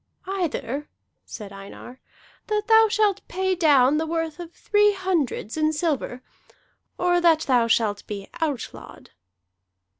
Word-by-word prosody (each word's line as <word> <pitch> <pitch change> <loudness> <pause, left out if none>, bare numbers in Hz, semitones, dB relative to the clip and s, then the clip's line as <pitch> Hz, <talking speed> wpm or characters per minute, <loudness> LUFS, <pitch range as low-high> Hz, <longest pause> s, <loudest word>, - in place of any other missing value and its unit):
"Either," 305 -7 -3 0.4
said 205 -3 -9
Einar, 195 +6 -11 0.5
"that 420 -1 -1
thou 445 0 +6
shalt 415 -3 +1
pay 375 +1 -1
down 295 -5 +4
the 320 +1 -1
worth 325 0 -3
of 345 -1 -8
three 415 +3 +2
hundreds 345 - -2
in 310 0 +2
silver, 295 -5 -2 0.7
or 355 0 +2
that 330 -2 +4
thou 245 -5 +2
shalt 215 -3 0
be 200 -2 -6
outlawed." 290 -7 -5
320 Hz, 125 wpm, -24 LUFS, 250-375 Hz, 0.7 s, thou